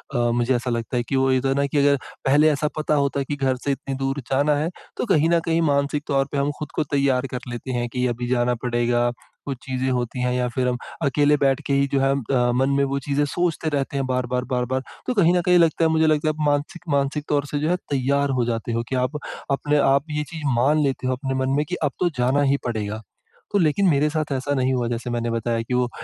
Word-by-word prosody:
अ, - - +2
मुझे 120 +2 +1
ऐसा 120 +1 -2
लगता 115 +2 -2
है 120 - 0
कि 135 - 0
वो 135 0 +3
ये 130 -1 +2
तो 135 - -1
है 135 - +1
ना 140 - +2
कि 145 - -2
अगर 140 0 +4 0.3
पहले, 145 +3 +5
ऐसा 150 +1 0
पता 155 0 0
होता 140 -1 +1
है 140 - -1
कि 145 - -3
घर 135 -2 0
से 140 - +2
इतनी 135 0 -4
दूर 135 +1 -2
जाना 145 +2 +3
है 155 +3 0 0.3
तो - - -1
कहीं 165 -5 +3
न 170 - +4
कहीं 165 0 +1
मानसिक 145 -1 +1
तौर 135 -1 +2
पर 145 - 0
हम 140 +1 +1
खुद 150 - -6
को - - +1
तैयार 135 -2 +2
कर 125 - -3
लेते 120 +2 -5
हैं 120 -1 -1
कि, 125 +1 -1
अभी 120 0 -3
जाना 125 0 +1
पड़ेगा 120 0 +1 0.3
कुछ 135 -2 -4
चीज़ें 130 0 -1
होती 125 0 -2
हैं 125 - +1
या 125 0 0
फिर 125 +1 -1
हम 125 - 0 0.3
अकेले 145 +2 +3
बैठ 135 -1 +2
के 140 - +1
ही 140 0 +3
जो 135 - +3
है 135 0 +3
अ, 125 -2 +1
मन 135 +2 +2
में 140 - +3
वो 140 0 -1
चीज़ें 140 +2 0
सोचते 165 +1 -1
रहते 140 -1 -2
हैं 135 - 0
बार-बार 125 -1 -1
बार-बार 130 +1 0 0.3
तो 255 - +1
कहीं 175 -4 +4
न - - +2
कहीं 180 0 +5
लगता 165 0 +3
है - - +3
मुझे 160 0 +3
लगता 155 0 +2
है - - 0
आप - - -4
मानसिक, 145 +5 -1
मानसिक 140 +1 0
तौर 145 -1 +1
से 145 - -1
जो 155 - 0
है 180 - +3 0.2
तैयार 140 +1 +1
हो 120 - +2
जाते 115 0 -2
हो, 115 - -1
कि 130 - -1
आप 130 +4 0 0.3
अपने 145 +2 +1
आप 140 +1 +3
ये 150 0 -1
चीज़ 160 -2 -6
मान 145 +5 +3
लेते 135 -2 -1
हो 130 - +1
अपने 135 +1 -3
मन 130 - -1
में 150 - +1
कि 180 - -1
अब - - +1
तो 175 - +2
जाना 130 +4 +2
ही 140 - +3
पड़ेगा। 110 -2 -3 0.5
तो 205 - +2
लेकिन 175 +4 +3
मेरे 150 0 +3
साथ 155 -1 -2
ऐसा 135 +2 -1
नहीं 130 0 +1
हुआ 120 -2 0
जैसे 120 +1 -3
मैंने 120 0 -1
बताया 115 0 -1
कि 120 +2 -5
वो 125 -1 +1
135 Hz, 265 wpm, -23 LUFS, 125-145 Hz, 0.5 s, पहले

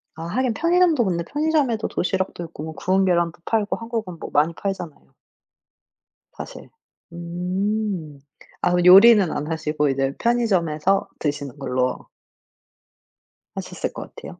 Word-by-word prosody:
아 160 - -7
하긴 245 +7 0
편의점도 335 -3 +3
근데 170 -3 -1
편의점에도 290 - 0
도시락도 185 -1 -2
있고 160 -2 -9
뭐 160 0 -6
구운 190 +3 +1
계란도 170 -2 +1
팔고 215 -2 0
한국은 225 -6 -5
뭐 - - -7
많이 155 +3 +2
팔잖아요 180 -4 -6 1.2
사실. - - -10 0.4
음. 180 -1 -3 0.5
아 180 - +2
그 180 0 +2
요리는 195 0 +8
안 150 +2 -3
하시고 150 -2 0
이제 135 0 0
편의점에서 195 -7 +1
드시는 145 -2 -3
걸로 125 -1 -2 1.5
하셨을 - - -5
것 - - -6
같아요? - - -10
180 Hz, 290 characters per minute, -22 LUFS, 160-220 Hz, 1.5 s, 요리는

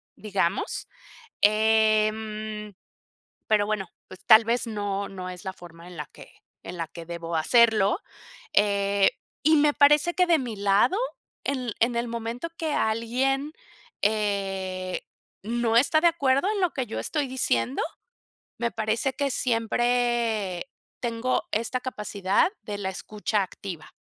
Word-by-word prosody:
digamos, 200 - -1 0.5
em 215 0 +2 0.7
pero 210 -2 +3
bueno, 205 -3 -2 0.2
pues, 185 - -13
tal 220 0 +8
vez 235 +1 0
no 205 -2 -3
no 185 -2 -7
es 180 -1 -9
la 190 - -4
forma 170 -1 -13
en 180 - -11
la 150 - -4
que - - -15 0.3
en 175 - -7
la 165 -2 -3
que 165 +1 -10
debo 170 0 -5
hacerlo, 220 - +4 0.5
eh, 200 -1 +3 0.3
y 315 +2 +5
me 295 0 +4
parece 295 +4 +5
que 360 - +3
de 335 -2 +5
mi 240 -5 -4
lado, 200 - +3 0.5
en 255 -4 -2
en 235 +1 +2
el 235 +1 -1
momento 235 +6 -4
que 320 -4 -2
alguien, 255 +6 0 0.5
eh, 195 -3 -1 0.4
no 230 +1 0
está 285 +5 +4
de 345 - +6
acuerdo 280 -1 +2
en 410 -3 -1
lo 360 - +2
que 260 -3 -2
yo 220 - -5
estoy 295 -3 -1
diciendo, 130 - 0 0.8
me 235 -1 0
parece 225 +4 0
que 280 +1 -1
siempre 235 -4 0 0.3
tengo 240 +1 -1
esta 230 +4 -1
capacidad 210 - 0
de 205 -1 -5
la 195 -2 -2
escucha 205 +2 -2
activa, 180 -3 -8
220 Hz, 140 wpm, -26 LUFS, 195-245 Hz, 0.8 s, tal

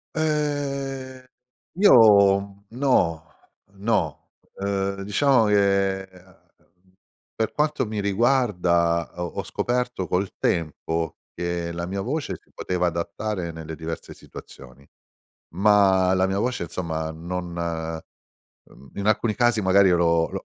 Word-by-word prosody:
Ehm, 140 -4 -2 0.6
io, 105 - +7
mhmm, 100 0 -12
no. 90 - +1 0.5
No. 95 -6 -1 0.3
Uhm, 100 0 -2
diciamo 120 +4 +3
che, 100 -2 +2
uhm, 90 0 -24 0.4
per 110 - -2
quanto 150 -4 0
mi 105 0 -4
riguarda 95 -6 +1
ho 90 - -4
ho 85 - -5
scoperto 125 -6 -2
col 95 +2 0
tempo 80 0 -2 0.2
che 85 -1 -3
la 85 +1 -4
mia 95 +2 -3
voce 145 +8 -3
si - - -33
poteva 90 -1 -2
adattare 85 +2 -3
nelle 80 0 -8
diverse 80 +1 -7
situazioni, 65 +2 -13 0.7
ma 95 -1 +4
la 95 0 +2
mia 95 +1 -1
voce, 120 -3 -1
insomma, 80 -2 -4
non 90 +3 -5
mhmm, 80 -5 -8
in 100 - -3
alcuni 110 +1 +2
casi 120 0 +2
magari 95 +1 +5
io 90 - +4
l'ho 85 -1 +2
l'ho - - -6
95 Hz, 125 wpm, -24 LUFS, 85-110 Hz, 0.7 s, io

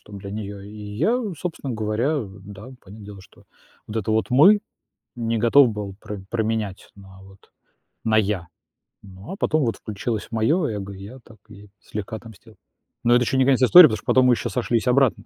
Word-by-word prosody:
чтоб 105 - -12
для 100 0 -9
неё, 100 -2 -6
и 100 - -11 0.3
я, 230 - +2 0.2
собственно 160 -7 -5
говоря, 115 +7 -1 0.2
да, 100 +1 -11 0.2
понятное 100 +2 -13
дело, 100 -1 -11
что 95 - -20 0.4
вот 110 - -7
это 110 0 -2
вот 110 0 +1
"Мы" 180 +12 +6 0.6
не 115 -1 -2
готов 120 +4 +5
был 105 -3 -6
про 105 -2 -8
променять 110 -4 -3
на 95 -1 -15
вот 95 0 -19 0.5
на 110 -1 +2
"Я". 100 -5 0 0.5
Ну, 95 - -11
а - - -5
потом 155 -6 +1
вот 115 - -1
включилось 110 +1 -5
моё 115 +10 +1
эго, 100 -3 -5
и 95 0 -11
я 125 +6 -11
так 110 -1 -17
ей 105 -1 -14
слегка 105 +2 -6
отомстил. 110 -3 -13 0.5
Но 120 - +4
это 125 - +4
ещё 135 - -1
не 130 - +4
конец 130 -1 +2
истории, 175 +6 +9
потому 110 - -3
что - - -16
потом 130 0 +4
мы 125 - +5
ещё - - -4
сошлись 120 -2 -1
обратно. 130 -1 +2
110 Hz, 195 wpm, -22 LUFS, 100-125 Hz, 0.6 s, истории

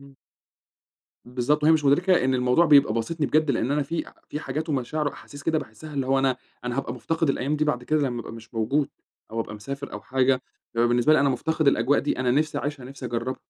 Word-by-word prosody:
امم. 140 -1 -16 1.1
بالضبط، 125 +5 0
وهي 155 - +6
مش 155 -2 +2
مدركة 175 +4 +4
إن 130 0 +2
الموضوع 125 +6 +3
بيبقى 140 -7 +6
باسطني 145 +7 -1
بجد، 155 -1 +2
لأن 120 0 0
أنا 145 +1 +2
في 160 +4 -3 0.2
في 150 - -4
حاجات 155 +4 -4
ومشاعر 150 +2 -1
وأحاسيس 145 0 -7
كده 160 +1 +1
باحسها، 145 +5 -9
اللي 135 -2 -1
هو 135 0 +3
أنا 135 -1 +2 0.3
أنا 125 +1 -2
هابقى 135 - -2
مُفتقِد 165 -2 -1
الأيام 140 +3 -1
دي 155 - +1
بعد 150 -5 0
كده 155 +2 +1
لمّا 120 -2 -3
أبقى - - -8
مش 115 0 -12
موجود، 135 +6 +1 0.4
أو 115 +1 -2
أبقى 105 - -5
مسافر 140 +6 -7
أو - - -5
حاجة، 130 -1 +1 0.3
بيبقى 120 +1 +3
بالنسبة 120 +5 +3
لي 155 - +5
أنا 140 - +3
مُفتقِد 155 +3 +1
الأجواء 135 +2 +3
دي، 145 - -2
أنا 125 -1 +1
نِفسي 150 +4 +1
أعيشها، 145 0 -4
نِفسي 135 0 -7
أجربها. 120 +2 -3
135 Hz, 220 wpm, -25 LUFS, 125-150 Hz, 1.1 s, وهي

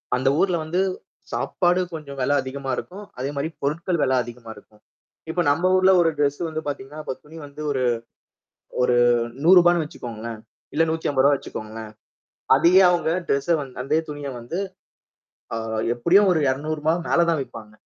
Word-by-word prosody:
அந்த 130 +2 +2
ஊர்ல 185 -1 +2
வந்து 165 +4 -2 0.5
சாப்பாடு 180 0 +1
கொஞ்சம் 145 -3 -7
வில 140 +3 +2
அதிகமா 135 +1 -5
இருக்கும். 200 +3 -7
அதேமாரி 140 +3 -2
பொருட்கள் 165 +5 -1
வில 130 -1 +2
அதிகமா 120 -1 -11
இருக்கும். 105 +1 -19 0.5
இப்ப 175 +1 0
நம்ம 175 +6 +1
ஊர்ல 185 0 +5
ஒரு 165 - +3
டிரெஸ் 145 -1 +1
வந்து 155 0 -4
பார்த்தீங்கன்னா, 145 +1 -6
இப்ப 130 - -4
துணி 160 +2 -13
வந்து 145 +1 -10
ஒரு, 130 -2 0 1.0
ஒரு 125 0 +3 0.5
₹100 175 +1 +7
ன்னு 170 -2 0
வச்சிக்கோங்களேன்! 115 -5 -7 0.3
இல்ல 160 +2 +4
₹150 145 -3 +2
வச்சிக்கோங்களேன். 110 -3 -8 0.6
அதேயே 175 +7 +6
அவுங்க 175 -2 +1 0.2
டிரெஸ் 140 +5 +1
வந்து 135 -3 -9
அதே 155 +4 +1
துணிய 145 -1 -5
வந்து, 120 +10 -5 1.0
அ, - - -2 0.4
எப்பிடியும் 185 +11 +4
ஒரு 160 - +1
₹200 155 +4 0
மேல 170 0 +3
தான் 160 -3 0
விப்பாங்க. 110 -4 -11
145 Hz, 150 wpm, -23 LUFS, 130-170 Hz, 1.0 s, ₹100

